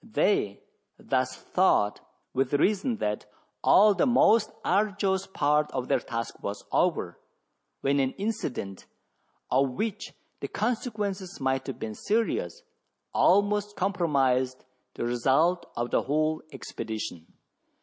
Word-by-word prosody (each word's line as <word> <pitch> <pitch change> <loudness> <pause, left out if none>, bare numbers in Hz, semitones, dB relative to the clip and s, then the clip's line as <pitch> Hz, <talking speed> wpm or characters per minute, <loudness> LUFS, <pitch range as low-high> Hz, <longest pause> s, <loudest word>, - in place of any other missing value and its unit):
They 205 - 0 0.3
thus - - -1
thought 105 0 +2 0.3
with 135 +1 +1
reason 210 - +1
that 105 - -2 0.4
all 210 +1 +6
the 270 - +2
most 230 -3 +4 0.2
arduous 195 -1 +1
part 150 -4 +1
of 130 -1 -3
their - - +3
task 115 -2 -5
was 100 0 -5
over, - - 0 0.6
when 140 +1 +2
an 135 -1 +1
incident, 195 - -4 0.6
of 135 +1 +3
which 210 - -4 0.2
the - - -4
consequences 210 -5 -3
might 130 -1 -1
have 135 - -4
been 110 - -5
serious, 230 - -1 0.5
almost 205 +2 +3
compromised 135 -10 +1 0.3
the - - -3
result 135 +9 +2
of 120 +1 -2
the - - +3
whole 155 +2 0
expedition. 105 -7 -6
155 Hz, 120 wpm, -27 LUFS, 130-205 Hz, 0.6 s, all